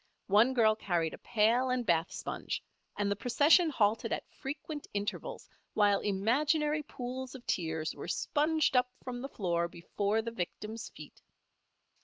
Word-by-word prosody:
One 235 +6 +6
girl 220 -3 +5
carried 175 -6 -1
a - - -9
pail 235 +3 +2
and 255 -1 0
bath 170 -2 +2
sponge, - - -4 0.3
and 205 0 0
the - - +2
procession 290 - +4
halted 220 -6 +1
at - - -2
frequent 295 +1 -6
intervals 205 0 -3 0.3
while 205 -1 +4
imaginary 295 +10 +1
pools 260 -2 -6
of 250 - -11
tears 160 -3 -1
were - - -8
sponged 305 -1 +1
up 250 0 +4
from 245 -1 -5
the 275 - -5
floor 170 -7 0
before 200 +5 -1
the 230 - -4
victim's 215 +2 -5
feet. - - -13
230 Hz, 150 wpm, -32 LUFS, 200-265 Hz, 0.3 s, One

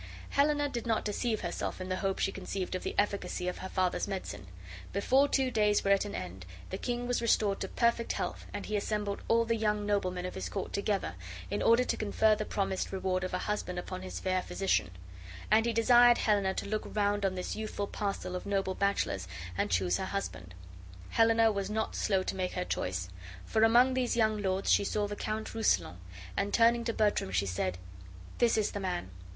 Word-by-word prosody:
Helena 290 +1 +3
did 235 -4 -4
not 225 -1 +1
deceive 220 +2 -1
herself - - -3
in 185 - -5
the 185 0 -1
hope 195 -1 -1
she - - 0
conceived 190 -1 -4
of 185 - -2
the - - -4
efficacy 200 -3 0
of 180 - -3
her 190 - -6
father's 185 0 0
medicine. 190 - -5 0.5
Before 260 +8 +3
two 265 -2 +1
days 210 -2 +3
were 200 - +2
at 200 +1 +4
an 205 - -5
end 95 +1 -6 0.3
the 190 - -3
king 245 0 -2
was 245 -1 0
restored 210 -3 +2
to 190 - -3
perfect 235 +2 +1
health, - - -4
and - - -5
he 215 - -2
assembled 205 -1 -2
all 230 0 +3
the 230 0 +1
young 210 -2 0
noblemen 185 -3 0
of 180 - -4
his - - -4
court 195 - -4
together, 200 - -1 0.4
in - - -1
order 230 +2 +5
to - - -1
confer 215 +1 +3
the 215 - -3
promised 195 -2 -2
reward 185 -1 -1
of 185 - -3
a 180 - -3
husband 210 -3 -2
upon 185 +1 -5
his 185 - -6
fair 185 -1 0
physician; 195 - 0 0.6
and 220 +2 +5
he - - +2
desired 240 +1 +6
Helena 200 -3 +2
to - - -3
look 215 +1 -1
round 205 -1 +1
on 190 -1 +1
this 180 - -3
youthful 215 -1 -3
parcel 200 -3 -3
of 180 - -5
noble 195 -1 0
bachelors 200 - 0 0.3
and 100 - 0
choose 90 -1 +2
her - - -3
husband. 90 - -5 0.6
Helena 225 0 +4
was 200 -1 -2
not 220 +1 -2
slow 190 -2 +1
to - - -3
make 185 -1 -2
her 180 - -2
choice, 90 - -2 0.4
for 220 - 0
among 240 +3 +6
these 250 -2 0
young 215 -2 +2
lords 190 0 0
she - - +5
saw 205 +1 0
the 205 - -5
Count 215 +1 -4
Rousillon, 90 - +1 0.4
and, 200 +1 0
turning 235 0 +4
to 230 - +1
Bertram, 210 - +1
she 95 +2 +1
said: 90 -1 -2 0.6
"This 235 -2 +4
is 215 - +1
the 205 - -4
man. 180 - -3
205 Hz, 210 wpm, -31 LUFS, 185-225 Hz, 0.6 s, desired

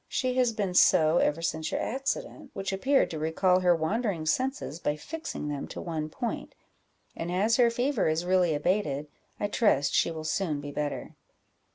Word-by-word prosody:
"She 255 -1 -1
has 250 -2 +3
been 205 -4 -2
so 160 -2 +5
ever 165 +3 +1
since 160 -1 -1
your - - -1
accident, 270 - -3
which 195 0 -3
appeared 270 +8 +2
to 160 - -4
recall 180 +4 +2
her 180 -1 +4
wandering 175 +1 -1
senses 255 - -1
by 150 - -1
fixing 310 - -6
them 145 -1 -4
to - - -8
one 155 -3 -4
point; 235 +8 -5 0.6
and 170 +1 -4
as 205 +6 +2
her 240 -2 +5
fever 245 0 0
is 160 +2 0
really 180 -3 +3
abated, 150 -3 -1 0.3
I - - 0
trust 205 - +2
she - - +3
will 160 -1 -6
soon 155 -1 -1
be 145 0 -6
better." 145 0 -4
180 Hz, 180 wpm, -28 LUFS, 155-230 Hz, 0.6 s, so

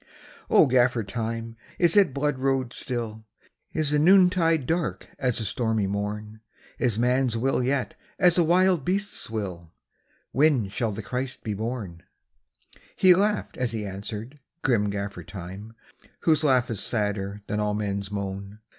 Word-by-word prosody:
O - - +6
Gaffer 125 -3 +3
Time, 115 +2 -4 0.2
is 175 0 +3
it 195 -7 +5
blood 140 0 -1
road 130 -2 0
still? 115 -4 -4 0.5
Is 155 -2 0
the 150 - +3
noontide 175 -3 +4
dark 165 +3 -2
as 125 -3 0
the 110 - -2
stormy 110 -1 0
morn? 105 +2 -4 0.4
Is 120 -5 +1
man 125 +3 +2
s 115 - -2
will 130 +2 +1
yet 130 0 0 0.2
as 180 -2 +5
a - - +5
wild 180 -1 +3
beast 200 +4 -1
s - - -5
will? 90 -7 -5 0.6
When 135 -7 +3
shall 110 +3 -1
the 105 +1 -6
Christ 125 +3 -4
be 110 - -2
born? 105 -5 -5 0.5
" 65 - -39 0.3
He 185 -1 +7
laughed 205 +3 0
as 125 -3 -1
he 110 -2 -3
answered, 105 +7 -7 0.2
grim 105 -6 +2
Gaffer 100 0 -4
Time, 95 +3 -9 0.5
Whose 155 -2 +3
laugh 130 -5 +3
is 110 - -3
sadder 105 -1 -2
than 105 - -2
all 105 0 0
men 100 -1 -1
s 100 -1 -7
moan. 100 0 -5
115 Hz, 165 wpm, -26 LUFS, 105-140 Hz, 0.6 s, He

